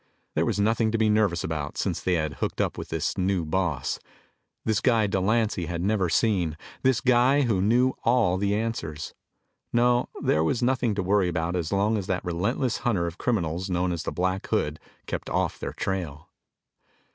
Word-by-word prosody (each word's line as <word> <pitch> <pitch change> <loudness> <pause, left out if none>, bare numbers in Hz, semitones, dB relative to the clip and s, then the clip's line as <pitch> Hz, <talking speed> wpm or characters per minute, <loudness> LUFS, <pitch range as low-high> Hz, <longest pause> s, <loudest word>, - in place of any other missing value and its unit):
There - - +1
was - - 0
nothing 110 +1 +2
to 115 - +1
be 110 -1 +3
nervous 105 -6 +2
about 75 -3 -4
since - - -1
they 90 - +1
had 80 -3 -2
hooked - - -2
up - - 0
with - - -7
this - - -2
new 95 -2 +1
boss 80 -6 -1 0.7
this 110 -2 +1
guy 115 -4 +3
Delancy 100 -1 +1
had 85 0 -3
never 100 -3 +1
seen; 90 -7 +1 0.2
this 130 -3 +2
guy 130 +3 +4
who 110 -8 +1
knew 125 +6 +3
all 115 -7 +3
the 100 +1 +1
answers. 105 -9 -3 0.6
No, 120 +1 +3
there 75 - +2
was 115 +9 0
nothing 125 -3 +1
to 100 - -1
worry 95 0 +2
about 85 +1 -1
as 85 -2 -2
long 100 +3 +2
as 95 - -6
that 95 -1 -2
relentless 105 +8 0
hunter 100 -8 0
of 85 +1 -5
criminals 90 -5 -1
known 90 0 0
as 85 -2 -2
the - - -3
Black 95 +2 -1
Hood 75 +1 0 0.3
kept - - -4
off - - -1
their - - -4
tail. 80 -6 -4
95 Hz, 185 wpm, -26 LUFS, 85-115 Hz, 0.7 s, guy